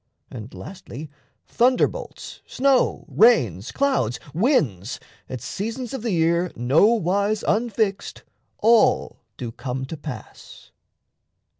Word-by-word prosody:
And 115 0 -8
lastly, 155 -6 -9 0.3
thunder 250 +1 +3
bolts, - - -9
Snow, 270 -1 +2
rains, 120 - +3
clouds, 265 - 0
winds, 145 - +1 0.3
at 130 -3 -5
seasons 230 - -5
of 265 - -4
the 235 - -2
year 170 -1 +1
Nowise 200 - +2
unfixed, 215 -2 -1 0.3
all 230 +1 +3 0.2
do 120 -2 -5
come 130 +2 -5
to 150 - -6
pass. 145 -7 -10
185 Hz, 105 wpm, -23 LUFS, -, 0.3 s, thunder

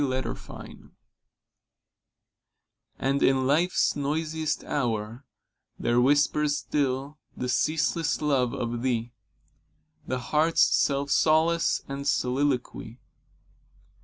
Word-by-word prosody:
25 130 -1 -5 2.1
And 140 +1 0
in 130 -1 +3
Life's 165 +7 +2
noisiest 155 +2 -2
hour 115 -1 -3 0.5
There 120 +1 +1
whispers 145 +2 +2
still 140 +1 -2 0.2
the 125 - -3
ceaseless 160 +4 0
love 135 -5 +1
of 120 0 -3
thee, 120 -2 -2 0.9
The 130 - -1
heart's 155 +6 +2
self 140 0 +1
solace 165 +2 +2
} - - -32
and 140 +1 -5
soliloquy. 125 -3 -1
140 Hz, 90 wpm, -26 LUFS, 125-150 Hz, 2.1 s, in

